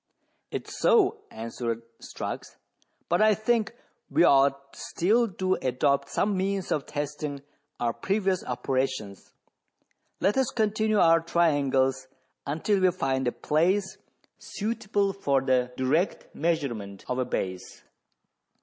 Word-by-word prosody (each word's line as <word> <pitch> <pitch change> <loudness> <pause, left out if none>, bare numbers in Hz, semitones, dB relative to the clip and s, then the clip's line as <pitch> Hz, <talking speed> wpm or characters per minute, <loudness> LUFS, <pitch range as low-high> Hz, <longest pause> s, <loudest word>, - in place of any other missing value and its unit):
It - - -5
is - - -8
so," 445 -3 +4
answered 115 0 -4 0.2
Strux; - - -6 0.5
"but 175 +3 +2
I 215 -1 +5
think 225 +1 0 0.3
we 150 +5 +3
ought 140 -1 +3
still 225 +7 +1
to 185 +1 0
adopt 135 +2 +1
some 205 0 0
means 195 0 -1
of 145 - -1
testing 145 -1 -4 0.4
our 120 -1 0
previous 190 - 0
operations. 130 -5 -3 0.9
Let 205 - +2
us 265 -2 +2
continue 215 -1 +1
our 165 -3 +6
triangles 140 -6 +1 0.4
until 165 +8 +1
we 185 - +5
find 135 -7 -1
a - - +2
place 190 +8 0 0.4
suitable 205 -2 -1
for 140 -8 +1
the 130 -2 +1
direct 145 +9 0
measurement 120 - -2
of 125 0 -2
a 130 - +1
base. 95 -5 -4
155 Hz, 120 wpm, -27 LUFS, 130-195 Hz, 0.9 s, our